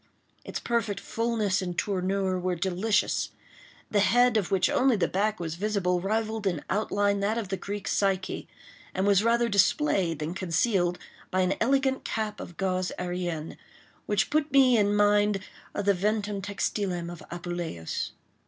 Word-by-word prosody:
Its - - -5
perfect 230 -4 -1
fullness 225 -5 0
and 180 -2 -4
tournure 190 -1 0
were 180 0 -1
delicious. 190 +5 0 0.6
The 210 - +3
head, 245 +3 +4
of 205 -5 +1
which 190 -2 +3
only 260 -2 +3
the 190 - +1
back 210 +3 0
was 165 -2 -3
visible, 180 -1 0
rivalled 220 +1 -1
in 175 -6 -2
outline 205 -1 +1
that 205 +3 0
of 215 -5 -3
the 195 - 0
Greek 200 +2 -5
Psyche, 195 -2 0 0.5
and 190 - +1
was 200 0 +4
rather 235 +1 +3
displayed 200 - +2
than 155 +3 -3
concealed 180 0 +1 0.3
by 185 0 +1
an 185 +1 +2
elegant 265 +2 +2
cap 215 -1 -3
of 175 - -9
gaze 185 -1 0
äérienne, 175 -3 -3 0.5
which 210 +1 +1
put 305 -1 +1
me 265 -3 +6
in 205 -2 +3
mind 205 0 +3 0.4
of 205 - -2
the 200 - +5
ventum 205 +1 -1
textilem 190 -3 -2
of 175 - -9
Apuleius. 175 - -4
200 Hz, 155 wpm, -27 LUFS, 180-215 Hz, 0.6 s, me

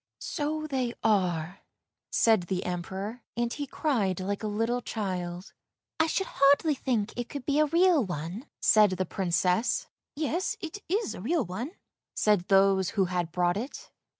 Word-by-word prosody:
" - - -64 0.2
So 310 +1 -1
they 260 -5 -2
are," 180 -5 +1 0.5
said 220 -6 +3
the 185 +1 -2
Emperor, 190 +6 -4 0.2
and 235 0 0
he 290 -1 -4
cried 225 - 0
like 200 +2 -2
a 215 - -2
little 225 +4 0
child. 180 -5 -4 0.2
" - - -64
I 320 - +4
should 385 +4 0
hardly 285 +3 +4
think 240 -6 -1
it 245 0 -4
could 280 -3 -6
be 290 0 +2
a 305 - +4
real 335 -1 +4
one," 180 - -5
said 215 -1 +6
the 185 - 0
Princess. 180 - +1 0.2
" - - -64
Yes, 320 +5 -1
it 330 +4 -6
is 415 +4 0
a - - -8
real 300 - +1
one," 225 - -5 0.4
said 205 -4 +2
those 195 -1 +4
who 195 - +4
had 175 -2 -1
brought 175 +1 +1
it. 245 +7 -6
220 Hz, 175 wpm, -28 LUFS, 185-285 Hz, 0.5 s, said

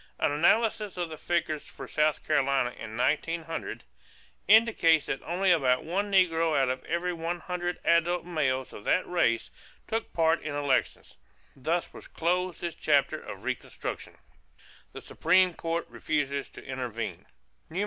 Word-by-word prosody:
An - - +1
analysis 210 +6 +2
of 175 -2 -2
the 155 - -7
figures 160 -3 -1
for 135 - -9
South 150 +2 +1
Carolina 140 -4 +2
in 110 -2 -8
1900 165 +5 -1 0.6
indicates 205 -8 +5
that 135 - -3
only 185 +3 +1
about 130 -7 +3
one 200 +5 -2
negro 165 -5 +3
out 135 -1 +2
of 130 0 -3
every 175 +1 -1
hundred 175 +1 -3
adult 170 +1 +2
males 130 -7 -1
of 105 - -9
that 185 - +2
race 115 -10 +1 0.3
took 225 0 -3
part 165 0 +2
in 155 -2 -4
elections. 145 -2 -1 0.4
Thus 165 +6 -2
was - - -11
closed 180 +1 -1
this 170 -1 -3
chapter 145 -3 +2
of - - -9
reconstruction. - - -5 0.8
=The - - -8
Supreme 185 +2 +3
Court 165 +1 -2
Refuses 140 -2 -2
to - - -12
Intervene. 125 -4 -5
165 Hz, 140 wpm, -28 LUFS, 140-175 Hz, 0.8 s, indicates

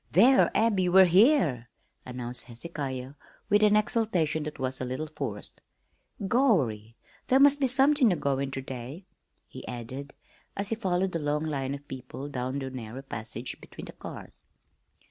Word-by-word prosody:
"There, 245 - +6
Abby, 200 -4 +2
we're 190 +1 +7
here!" 180 - +3 0.4
announced 125 -1 -4
Hezekiah 130 0 -6 0.4
with 205 0 +4
an 210 0 +5
exultation 210 -8 +1
that 150 - -6
was 130 0 -3
a - - -1
little 130 +5 -3
forced. 140 -9 -7 0.7
"Gorry! 135 - +1 0.3
There 265 - +4
must 285 +1 +6
be 270 - +2
somethin' 270 0 +4
goin' 140 -1 0
on - - -8
ter 135 - -4
day," 130 +7 -8 0.4
he - - -10
added, 130 +4 -7 0.4
as 200 +1 -3
he 225 - 0
followed 190 -3 0
the 165 - -2
long 150 +1 -1
line 140 -3 -2
of 145 0 -13
people 130 +2 -7
down 130 0 -3
the 135 -1 -4
narrow 125 +1 -7
passage 115 -1 -6
between - - -10
the - - -10
cars. - - -10
145 Hz, 160 wpm, -28 LUFS, 130-205 Hz, 0.7 s, we're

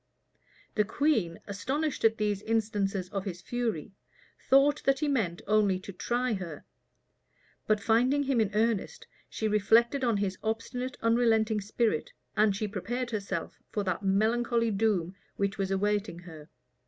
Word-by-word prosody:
The 210 - +3
queen, 215 - 0
astonished 265 +9 -2
at 225 0 +4
these 210 -2 0
instances 205 -4 -1
of 195 -1 -4
his 180 -3 -5
fury, 225 -6 -3 0.6
thought 280 +2 +5
that 275 0 +4
he 300 +2 -1
meant 210 -12 -1
only 205 -2 +3
to 195 +1 -9
try 240 +5 -1
her; 175 -6 -6 1.0
but 215 -1 +3
finding 250 +7 +3
him 265 -4 +2
in 215 - +1
earnest, 220 -1 0 0.2
she 220 - -2
reflected 230 +6 +3
on 235 -4 +2
his 195 -2 -2
obstinate, 245 +4 -3
unrelenting 225 -2 +3
spirit, 210 -4 -1 0.2
and 210 -2 +3
she 210 +2 -2
prepared 240 +5 -3
herself 195 -5 -4
for 205 - -2
that 185 +1 -2
melancholy 230 +4 +2
doom 195 -4 +1 0.2
which 200 0 -1
was 195 -1 0
awaiting 205 -1 0
her. 165 -3 -12
215 Hz, 145 wpm, -29 LUFS, 195-235 Hz, 1.0 s, thought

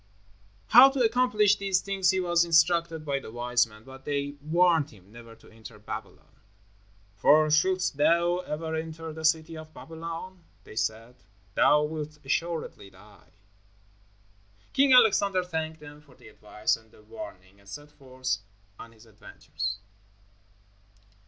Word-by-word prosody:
How 250 +4 +9
to 270 -1 -2
accomplish 215 -3 +3
these 195 -2 0
things 195 -1 0
he 190 -1 +2
was 175 -1 +2
instructed 165 -1 +2
by 140 -2 -1
the 135 - -11
wise 120 0 +1
men, 110 -1 -17
but 135 +2 -13
they 145 -1 -3
warned 165 -1 +2
him 100 -2 -19
never 115 0 -13
to - - -21
enter 110 0 -13
Babylon. 105 - -10 0.8
"For 155 +8 +4
shouldst 185 0 +1
thou 170 +4 +2
ever 160 -2 -5
enter 160 0 -5
the 160 0 -9
city 160 +1 +1
of 155 0 -11
Babylon," 165 +3 -8 0.2
they - - -14
said, 115 +3 -3 0.4
"thou 150 +7 +4
wilt 150 0 -5
assuredly 160 -7 -3
die." 100 +2 -20 1.4
King 275 0 +3
Alexander 200 -6 +4
thanked 160 -2 -5
them 145 0 -13
for 140 -4 -21
the - - -16
advice 105 0 -2
and 110 0 -19
the 105 - -20
warning, 100 - -11
and 100 0 -18
set 145 +7 -10
forth 130 -2 -4 0.4
on 115 - -12
his 110 +1 -19
adventures. 100 -2 -7
155 Hz, 145 wpm, -27 LUFS, 120-175 Hz, 1.4 s, How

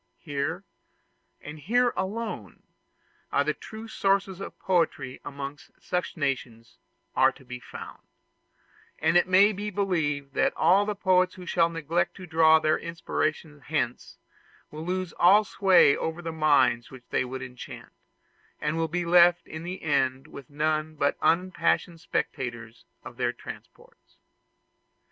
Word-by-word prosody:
Here, 155 +4 -3 0.8
and 150 +1 -9
here 240 - +2
alone, 190 - -4 0.7
the 145 +2 +1
true 220 +6 -10
sources 195 -3 0
of - - -8
poetry 165 -8 -1
amongst 140 0 -8
such 180 0 -3
nations 125 -6 -4 0.4
are - - +5
to 130 - -18
be 125 0 -7
found; - - -10 1.0
and 160 +2 +1
it 175 - +5
may 195 +3 +6
be 205 +1 -4
believed 155 -8 -1
that - - +1
the 205 +3 +3
poets 185 -2 +2
who 180 - -10
shall 170 -1 +2
neglect 170 +1 -1
to 185 - -9
draw 160 -1 +5
their 155 0 +1
inspirations 155 -2 -3
hence, 150 -6 -2 0.5
will 155 +1 -7
lose 185 -1 -2
all 200 +5 +6
sway 190 -8 +4
over 160 +2 -4
the 165 - -3
minds 130 -7 +2
which 130 -2 -12
they - - +1
would 130 +1 -6
enchant, 125 -1 -10 0.7
and 150 +2 -1
will 165 0 0
be 175 +2 -2
left 175 0 +5
in 160 - -8
the 180 +2 -6
end 135 -3 0
with 140 -4 -12
none 155 +1 -1
but 145 -1 +1
unimpassioned 180 -1 +1
spectators 120 -7 -4 0.2
of - - -11
their - - 0
transports. - - -13
160 Hz, 140 wpm, -27 LUFS, 140-185 Hz, 1.0 s, may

